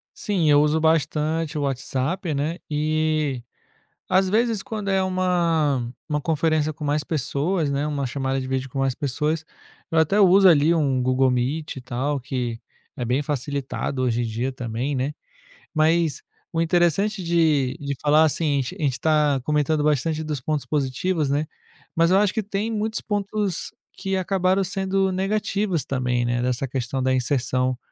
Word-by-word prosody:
Sim, 190 -7 0
eu 145 0 +6
uso 150 +1 +2
bastante 160 0 +1
o 145 - -1
WhatsApp, 140 +5 -2
né, 155 +5 -2
e, 155 -3 0 0.7
às 190 0 +3
vezes 225 -1 +1
quando 210 -3 -4
é 190 -1 +2
uma 165 -9 +1 0.2
uma 150 -1 -1
conferência 155 0 +1
com 150 0 -7
mais 145 +1 0
pessoas, 155 +3 -1
né, 140 +1 -1
uma 145 -2 -2
chamada 135 +1 -2
de 130 - -5
vídeo 130 0 -2
com 135 - -5
mais 135 -2 +1
pessoas, 150 +4 -1 0.5
eu 165 - +3
até 160 +6 +2
uso, 195 0 +7
ali, 160 0 +5
um 135 -6 +1
Google 130 +1 +3
Meet, 130 +6 -1
e 130 - -7
tal, 130 +3 -2
que 125 -3 -3 0.4
é 125 - -4
bem 125 +4 +1
facilitado 140 -1 -3
hoje 120 -2 +1
em - - 0
dia 115 +3 -2
também, 125 +3 -3
né. 135 +3 -1 0.6
Mas, 160 0 +2 0.3
o 165 - -2
interessante 180 +4 +1
de 155 -6 +2
de 140 -1 -3
falar, 150 +2 +5
assim, 150 -1 +1
a - - +2
a 135 +4 -4
gente 140 - +3
está 150 +2 +2
comentando 150 0 +1
bastante 155 +2 +1
dos 150 -4 -3
pontos 150 +1 -2
positivos, 150 +2 -1
né, 145 +2 0 0.5
mas 165 +2 +3
eu 190 - +5
acho 205 -1 +3
que 220 -2 -1
tem 205 +2 -2
muitos 220 0 -1
pontos 205 -2 -2 0.2
que 195 0 -2
acabaram 185 +1 +1
sendo 190 0 0
negativos 195 -2 -1
também, 125 -2 0
né, 120 0 0
dessa 125 +2 -1
questão 130 +1 -3
da 130 0 +2
inserção 130 -1 0
150 Hz, 170 wpm, -23 LUFS, 135-175 Hz, 0.7 s, uso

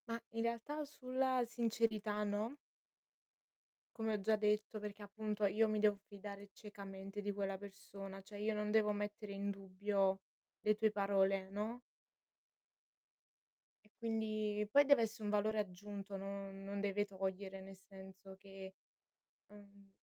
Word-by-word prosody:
Ma, 230 0 -1
in 230 - 0
realtà, 235 +6 -1
sulla 260 -2 +1
sincerità, 220 -3 +1
no? 210 +5 0 1.4
Come 225 -1 0
ho 210 - +1
già 215 +2 +4
detto. 210 +1 +2
Perché, 210 0 -6
appunto, 210 0 -1
io 215 +3 +4
mi 215 0 +1
devo 210 -1 +5
fidare 200 0 -8
ciecamente 195 -1 -7
di 205 0 -1
quella 195 -1 -1
persona, 195 0 -8
cioè, 205 +1 -9
io 215 +1 +1
non 210 0 0
devo 215 -1 +5
mettere 205 0 -3
in 200 +1 -1
dubbio 195 0 +1 0.4
le 215 0 +4
tue 215 0 +3
parole, 195 -1 +3
no? 215 +5 -2 2.2
Quindi 215 -2 0
poi 285 +4 +9
dev'esse 230 -5 +5
un 210 - -1
valore 210 +1 +2
aggiunto, 200 0 -4
non 195 0 -5
non 200 +1 -3
deve 205 0 +1
togliere, 190 0 -3
nel 195 0 -10
senso 190 0 -11
che 195 -1 -9 0.8
ehm 200 -1 -15
205 Hz, 135 wpm, -39 LUFS, 195-215 Hz, 2.2 s, poi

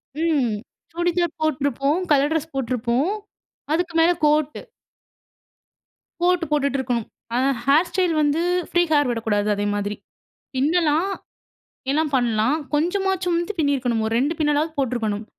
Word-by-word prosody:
ம். 300 -8 +1 0.4
சுடிதார் 345 -1 0
போட்டிருப்போம். 285 +1 0
Colour 290 +1 +4
dress 320 0 -1
போட்டிருப்போம். 250 - 0 0.6
அதுக்கு 345 +1 -1
மேலே 345 +2 +5
கோட்டு, 300 0 +1 1.6
கோட்டு 355 -1 +2
போட்டுட்டு 280 -2 +1
இருக்கணும். 240 -3 -2 0.3
ஆனா, 260 +2 +2 0.2
ஹேர் 305 +6 +4
ஸ்டைல் 360 -3 +1
வந்து, 295 +3 +2 0.3
ஃப்ரீ 350 0 +3
ஹேர் 290 -4 +3
விடக்கூடாது 215 -3 0
அதே 205 0 -2
மாதிரி. 205 0 -2 0.6
பின்னலாம், 320 +5 +2 0.8
எல்லாம் 305 +1 +1
பண்ணலாம். 235 +3 +1 0.2
கொஞ்சமாச்சும் 360 +2 +1
வந்து 345 +4 -3
பின்னியிருக்கணும். 255 -6 +1
ஒரு 220 - -2
2 290 +6 +1
பின்னலாவது 300 +1 +1
போட்டிருக்கணும். 225 -5 -1
295 Hz, 120 wpm, -22 LUFS, 250-335 Hz, 1.6 s, மேலே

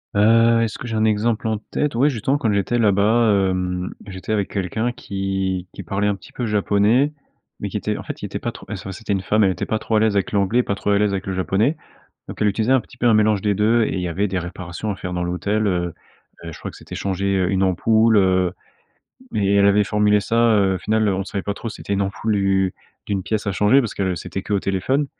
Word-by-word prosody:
Heu, 115 +2 +5
est-ce 110 -2 -2
que 125 - -7
j'ai 110 - -3
un 110 - +2
exemple 110 +1 +1
en 110 -1 0
tête? 150 -5 -1
Ouais, 140 +5 +4
justement, 135 +3 0
quand 115 -7 0
j'étais 100 +4 0
là-bas, 105 -1 +3
hem, 90 0 -2 0.2
j'étais 95 +1 -7
avec 100 -3 0
quelqu'un 105 +5 -1
qui 95 -4 -3
qui - - -8
parlait 100 +3 -2
un 105 - +2
petit 100 - -15
peu 120 - -4
japonais, 105 +6 +2 0.5
mais - - -4
qui - - -3
était - - -2
en - - -7
fait, - - -7
il - - -4
était - - -5
pas - - -3
trop - - -13
et - - -3
ce 95 - -7
c'était 100 +2 -4
une 95 - -1
femme, 105 +2 +2
elle 95 - +3
était 90 - -3
pas 110 - -1
trop 110 - -2
à - - +5
l'aise 110 -2 +2
avec 100 - 0
l'anglais, 105 +4 +2
pas 100 - -2
trop 105 - -1
à 100 - +3
l'aise 105 -1 +1
avec 95 0 -3
le 95 - -3
japonais, 100 - +1 0.5
donc - - -8
elle 105 - +3
utilisait 110 +5 +1
un 130 - +4
petit 120 +2 -16
peu 120 - -1
un 115 - +6
mélange 105 -2 +3
des 105 -1 +1
2, 110 +3 +3
et - - -2
il 95 - -2
y 90 - -2
avait 100 +5 0
des 95 0 -2
réparations 90 +3 -5
à 100 - -3
faire 90 -1 -6
dans 90 0 -2
l'hôtel, 100 +5 -1
heu 90 -3 0 0.5
heu, 85 - -6
je - - -11
crois - - -5
que - - -13
c'était - - -10
changer, 100 0 -1
heu, 90 0 +1
une 95 -1 +1
ampoule, 110 +4 +3
heu, 95 -2 +3 0.8
mais 100 -1 +1
elle 100 0 +5
avait 100 +1 +4
formulé 105 0 +3
ça, 115 0 +3
heu, 95 -2 +2
final, 110 +1 +1
on 95 0 0
savait 100 -1 -4
pas 100 - -3
trop 115 - -6
si - - -8
c'était - - -5
une 100 0 +1
ampoule, 100 +2 -1
u 95 -1 +1 0.3
d'une 100 -2 -1
pièce 110 +1 -2
à 100 - 0
changer 105 +9 +4
parce 115 -5 -3
que 95 -2 -1
c'était 90 +2 -5
qu'au 100 0 0
téléphone, 130 +10 0
100 Hz, 260 wpm, -21 LUFS, 95-110 Hz, 0.8 s, un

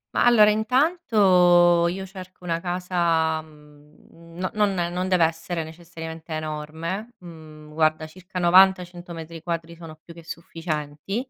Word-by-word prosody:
Ma, - - +3
allora 230 -3 +6
intanto 205 - +4
io 190 +2 -5
cerco 185 -1 -12
una 165 -1 -2
casa, 175 -3 0
uhm, 155 +2 -17 0.2
non 210 -1 +2
non 175 -2 -2
non 185 +1 -2
deve 180 -3 +4
essere 165 0 -3
necessariamente 165 0 -10
enorme, 160 +8 -5
mhmm, 155 -4 -13
guarda 155 0 +1
circa 180 +2 -8
90-100 180 -1 +3
metri 165 0 -8
quadri 170 -1 -4
sono 165 -2 -11
più 170 - -13
che 170 0 -13
sufficienti. 165 - -5
170 Hz, 135 wpm, -24 LUFS, 160-185 Hz, 0.2 s, allora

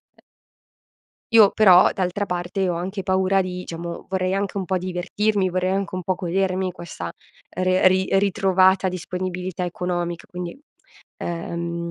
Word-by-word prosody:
E - - -25 1.1
Io, 215 -3 +8
però, 190 -4 +7
d'altra 190 +2 -1
parte, 180 +2 -2
ho 175 - 0
anche 190 +4 -4
paura 190 +1 +2
di 180 -1 -3
diciamo, 170 0 -6
vorrei 190 -1 0
anche 200 0 -2
un 190 - -3
po' 185 - 0
divertirmi, 185 +3 0
vorrei 185 +1 0
anche 195 0 -2
un 185 - -3
po' 185 +2 0
godermi 185 +1 -1
questa 150 - -7 0.5
re 185 0 +4
ri 185 0 +1
ritrovata 190 -1 +3
disponibilità 185 0 -4
economic 175 -1 -3
Quindi 180 +2 -7 0.7
uhm, 170 0 -4
185 Hz, 140 wpm, -23 LUFS, 175-190 Hz, 1.1 s, Io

